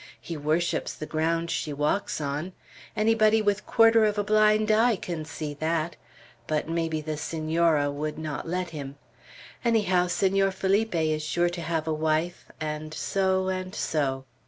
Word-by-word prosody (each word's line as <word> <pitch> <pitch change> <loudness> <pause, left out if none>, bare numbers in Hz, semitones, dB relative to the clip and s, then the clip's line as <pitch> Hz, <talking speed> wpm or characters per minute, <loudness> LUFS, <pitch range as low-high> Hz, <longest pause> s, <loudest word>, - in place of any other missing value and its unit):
"He 170 - -6
worships 155 +3 -1
the 155 - -6
ground 165 +2 -1
she 150 - -2
walks 150 +8 -1
on. 150 +5 -3 0.4
Anybody 215 0 +4
with 210 -1 0
quarter 225 -1 +5
of 210 -1 +1
a 205 - +1
blind 215 +1 +3
eye 225 +2 +4
can 170 -4 -5
see 155 -1 -5
that; 160 +1 -1 0.5
but 155 0 -1
maybe 165 -1 -1
the 155 0 -4
Senora 160 -1 +1
would 150 +1 -4
not 155 0 -5
let 180 0 -2
him. 140 -3 -7 0.7
Anyhow, 200 -7 +2
Senor 195 +2 +2
Felipe 195 +2 0
is 155 -1 +1
sure 175 +3 +1
to 175 0 -5
have 165 -1 -2
a 160 - +1
wife, 155 +2 -1
and 155 0 -4
so 190 +1 0
and 185 +1 -4
so." 135 -4 -1
170 Hz, 160 wpm, -26 LUFS, 155-195 Hz, 0.7 s, quarter